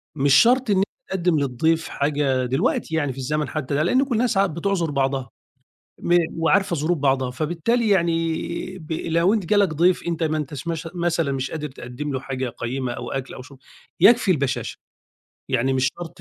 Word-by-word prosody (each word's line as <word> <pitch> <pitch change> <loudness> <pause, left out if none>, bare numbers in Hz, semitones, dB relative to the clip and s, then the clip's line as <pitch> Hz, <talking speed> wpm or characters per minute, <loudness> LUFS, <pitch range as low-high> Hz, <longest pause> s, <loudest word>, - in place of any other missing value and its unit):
مش 140 -1 +3
شرطْ 245 - +5
إن 200 - +3
أنت 190 - +4 0.3
تِقدِّم 175 -4 +1
للضيف 160 +5 0
حاجة 140 -3 0
دلوقتي 135 +5 0
يعني 145 -4 0
في - - -16
الزمن 150 +3 -1
حتى 145 -2 -3
ده، 150 - +2
لأن 255 +11 +3
كُلّ 270 -4 -2
الناس 235 -1 +1
عا 195 +1 +4
بِتُعذُر 170 0 -1
بعضها، 135 -2 -1 0.7
م 175 - +3 0.2
وعارفة 170 +3 +2
ظُروف 165 +3 0
بعضها 135 -2 +1
فبالتالي 175 - 0
يعني 165 -4 +2 0.5
ب 155 -1 -11
لو 170 +4 +1
أنت 215 -5 -1
جَه 210 - +2
لك 200 -1 +5
ضيف 175 +4 +2
أنت 170 -1 -1
ما 155 -1 0
أنتاش 145 0 -5
مش 165 -1 -3
مثلًا 170 -4 0
مش 135 0 -3
قادر 150 -2 -4
تِقَدّم 130 +2 -7
له 130 - -1
حاجة 130 -1 -4
قَيّمة 125 +2 -4
أو 120 0 -6
أكل 135 -1 -4
أو - - -8
شُرب، 140 +1 -14 0.4
يكفي 230 -4 +6
البشَاشة، 140 -6 -1 0.7
يعني 130 0 +1
مش 130 0 +2
شرط 175 -2 -6
155 Hz, 190 wpm, -23 LUFS, 135-175 Hz, 0.7 s, يكفي